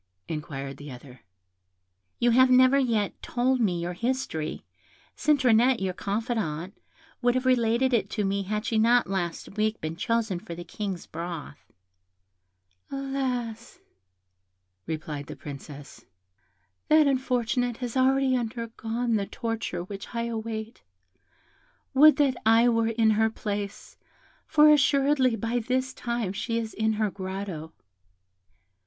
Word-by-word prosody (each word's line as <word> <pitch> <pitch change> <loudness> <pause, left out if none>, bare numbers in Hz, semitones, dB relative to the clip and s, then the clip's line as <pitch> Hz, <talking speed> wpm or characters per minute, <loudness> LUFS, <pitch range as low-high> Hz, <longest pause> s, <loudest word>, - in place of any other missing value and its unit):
inquired 140 -3 -5
the 145 0 -9
other. 125 0 -12 1.0
"You 240 0 +3
have 255 +2 +6
never 255 +2 +6
yet 225 -6 0
told 255 +2 0
me 180 -6 +1
your 175 +1 -3
history; 230 -7 -3 0.5
Citronette, 255 -4 +3
your 190 -1 -1
confidante, 200 -4 -3 0.5
would 245 0 +2
have 255 0 0
related 250 0 +2
it 230 - +1
to 210 -3 -1
me 200 +1 0
had 210 +3 -3
she 225 -1 +1
not 235 +2 +4
last 190 +1 -3
week 215 +1 0
been 155 +1 -4
chosen 220 -1 -1
for 175 -3 -8
the 175 - -7
King's 190 0 -5
broth." 165 -3 -7 1.2
"Alas!" 255 -4 -3 1.1
replied 155 -2 -5
the - - -7
Princess, 145 0 -10 0.8
"that 310 0 +6
unfortunate 245 -3 0
has 245 -2 -5
already 265 0 +3
undergone 230 0 -2
the 200 -1 -2
torture 225 -6 -3
which 200 +5 -9
I 235 - 0
await; 225 -1 -5 1.1
would 300 +3 +8
that 275 -4 +2
I 225 +2 +5
were 230 -1 +2
in 225 -1 +3
her 220 +1 +3
place, 205 -2 -5 0.5
for 300 -1 +6
assuredly 275 -3 +3
by 230 +3 -1
this 255 +3 -1
time 235 -7 -3
she 230 +3 -2
is 225 -1 -3
in 220 0 +1
her 215 -1 0
grotto." 185 -4 -6
225 Hz, 130 wpm, -27 LUFS, 195-250 Hz, 1.2 s, would